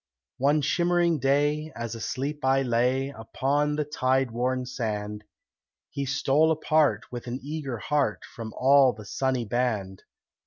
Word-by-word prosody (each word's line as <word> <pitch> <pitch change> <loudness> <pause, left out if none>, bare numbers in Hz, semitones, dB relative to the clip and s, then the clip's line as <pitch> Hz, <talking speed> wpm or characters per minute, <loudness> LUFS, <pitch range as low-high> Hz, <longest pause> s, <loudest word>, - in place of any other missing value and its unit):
One 145 +3 +3
shimmering 170 +1 +2
day, 145 +3 +1
as 115 -1 -4
asleep 135 +6 -4
I 135 +1 +3
lay 125 +2 +1
Upon 140 +4 -1
the 150 0 -1
tide 130 -3 0
worn 125 +2 -1
sand, 105 -4 -4 0.7
He 140 -1 -3
stole 135 +3 +2
apart, 155 -1 +2
with 120 0 -7
an 120 +2 -4
eager 145 -4 -4
heart, 115 -2 0
From 115 -2 -8
all 135 -1 +5
the 110 0 -11
sunny 130 +2 -1
band. 105 -5 -2
135 Hz, 140 wpm, -26 LUFS, 120-145 Hz, 0.7 s, all